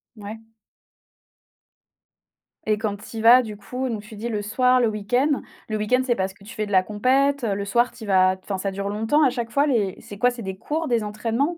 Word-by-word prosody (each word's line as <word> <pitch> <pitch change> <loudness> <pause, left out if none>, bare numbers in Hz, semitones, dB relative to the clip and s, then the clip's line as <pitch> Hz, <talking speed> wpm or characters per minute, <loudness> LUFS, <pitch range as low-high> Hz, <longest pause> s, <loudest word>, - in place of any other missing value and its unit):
Ouais. 210 +1 -8 2.3
Et 210 - +3
quand 210 -2 -2
tu 225 +2 -10
y - - -3
vas 240 +3 +8
du 215 -2 -7
coup, 250 +6 -5
donc 215 -3 -3
tu 215 +1 -12
dis 230 +3 -4
le 210 -3 -2
soir 250 +4 +2
le 230 - +3
week-end. 245 +8 0 0.3
Le 215 - -1
week-end 250 +5 +1
c'est 240 -2 +1
parce 190 0 -2
que 200 - -20
tu 215 - -11
fais 215 -1 -2
de 205 - -9
la 185 0 +5
compète, 260 +6 +1
heu, 200 -2 0
le 200 - -3
soir 240 +5 +2
tu 225 - -12
y - - -7
vas, 185 -1 +4
enfin, 195 -2 -3
ça 195 +1 -2
dure 200 +1 -4
longtemps 225 +9 +1
à 265 - +5
chaque 240 -2 -4
fois? 280 +3 +3
Les 210 -8 +1
c'est 205 - -10
quoi? 245 +3 +3
C'est 240 -1 -8
des 190 -1 -5
cours, 305 +7 -3
des 235 -2 +2
entraînements? 230 +10 -1
220 Hz, 240 wpm, -23 LUFS, 205-250 Hz, 2.3 s, vas